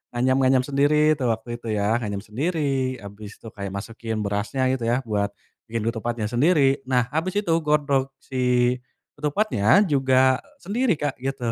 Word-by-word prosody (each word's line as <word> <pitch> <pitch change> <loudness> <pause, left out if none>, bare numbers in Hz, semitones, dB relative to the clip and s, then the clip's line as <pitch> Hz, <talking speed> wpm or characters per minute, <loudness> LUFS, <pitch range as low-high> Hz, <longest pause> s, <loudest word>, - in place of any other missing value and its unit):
nganyam-nganyam 130 +1 +3
sendiri 145 +3 +3
tuh 125 - 0
waktu 120 +1 -8
itu 115 - -10
ya 105 +3 +1
nganyam 100 -3 -4
sendiri 135 +1 -1
abis 100 +1 -10
itu 115 - -12
kayak 100 -2 -6
masukin 115 +2 -5
berasnya 105 +6 -1
gitu 120 -3 -2
ya 125 +3 +1
buat, 105 -3 0 0.4
bikin 115 -1 -3
ketupatnya 115 0 -3
sendiri 140 +1 +3
nah 125 -2 +3
abis 165 +5 -2
itu 170 - -1
godok 140 -3 0
si, 125 -1 +1 0.4
ketupatnya 150 - +3
juga 130 -1 +3 0.2
sendiri 225 -1 +1
Kak 145 -3 -3
gitu. 130 -3 -2
130 Hz, 150 wpm, -24 LUFS, 115-145 Hz, 0.4 s, nganyam-nganyam